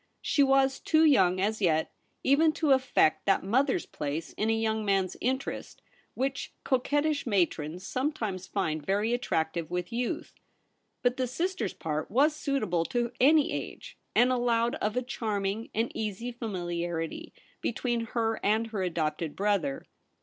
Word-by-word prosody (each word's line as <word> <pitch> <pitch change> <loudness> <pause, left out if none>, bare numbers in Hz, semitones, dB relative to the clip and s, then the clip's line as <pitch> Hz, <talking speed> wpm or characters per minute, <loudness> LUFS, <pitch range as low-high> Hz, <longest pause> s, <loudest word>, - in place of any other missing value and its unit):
She 290 - +2
was 270 -1 +4
too 315 0 +3
young 190 - +4
as 215 +3 0
yet 160 -4 +2 0.3
even 310 +4 +4
to 310 -3 +1
affect 260 - +3
that 195 - +3
mother's 255 - +1
place 150 +3 -4
in 215 - -1
a 225 0 +2
young 220 -1 0
man's 195 -2 +1
interest 265 +2 -3 0.4
which 270 +1 -2
coquettish 290 +3 +1
matrons 175 -4 0
sometimes 220 -10 -2
find 160 -7 -2
very 205 +7 +1
attractive 160 -8 -1
with 180 +5 -3
youth. 250 +8 -2 0.7
But 245 0 +2
the 255 -1 0
sister's 275 - -2
part 155 -1 -3
was 290 +7 +3
suitable 270 - 0
to 240 +2 -1
any 295 +3 +5
age, - - -6 0.2
and 245 +1 +5
allowed 240 -1 +2
of 210 +3 -2
a 250 - +1
charming 215 -3 -2
and 225 +2 -1
easy 220 +3 -4
fami 185 -8 -4
liarity 175 - -4 0.3
between 235 0 -1
her 225 -1 +1
and 215 +3 +2
her 205 -4 -2
adopted 165 -3 -2
brother. 195 -9 0
225 Hz, 150 wpm, -29 LUFS, 185-260 Hz, 0.7 s, any